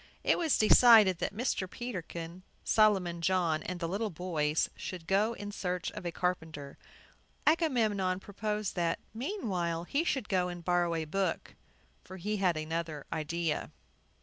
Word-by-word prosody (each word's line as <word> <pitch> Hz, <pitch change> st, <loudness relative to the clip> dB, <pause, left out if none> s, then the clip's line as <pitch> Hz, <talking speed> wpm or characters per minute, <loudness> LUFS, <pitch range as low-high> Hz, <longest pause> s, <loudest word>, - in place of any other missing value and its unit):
It -, -, +3 dB
was 325 Hz, -4 st, +2 dB
decided 215 Hz, -4 st, +7 dB
that -, -, -1 dB
Mr. 200 Hz, -3 st, -2 dB
Peterkin, 180 Hz, -7 st, -6 dB, 0.2 s
Solomon 190 Hz, -6 st, +3 dB
John, 170 Hz, -3 st, +1 dB
and 175 Hz, +3 st, -5 dB
the 165 Hz, -, -2 dB
little 205 Hz, +5 st, -2 dB
boys 160 Hz, -4 st, 0 dB
should 180 Hz, -3 st, -7 dB
go 205 Hz, +6 st, +2 dB
in 205 Hz, -2 st, -7 dB
search 180 Hz, -3 st, -3 dB
of 180 Hz, -, -6 dB
a -, -, -2 dB
carpenter. 160 Hz, -6 st, -3 dB, 0.7 s
Agamemnon 220 Hz, -, +2 dB
proposed 210 Hz, +1 st, -3 dB
that, 170 Hz, -2 st, 0 dB, 0.2 s
meanwhile, 200 Hz, -, -2 dB
he 280 Hz, -, 0 dB
should 270 Hz, -9 st, -1 dB
go 185 Hz, -2 st, +1 dB
and 175 Hz, -1 st, -7 dB
borrow 175 Hz, -1 st, +2 dB
a 160 Hz, -1 st, -2 dB
book; 185 Hz, +2 st, -2 dB, 0.5 s
for 190 Hz, -, -10 dB
he 210 Hz, +4 st, -2 dB
had 180 Hz, -4 st, +2 dB
another 155 Hz, -1 st, -4 dB
idea. 165 Hz, +1 st, -2 dB
185 Hz, 150 wpm, -31 LUFS, 170-210 Hz, 0.7 s, decided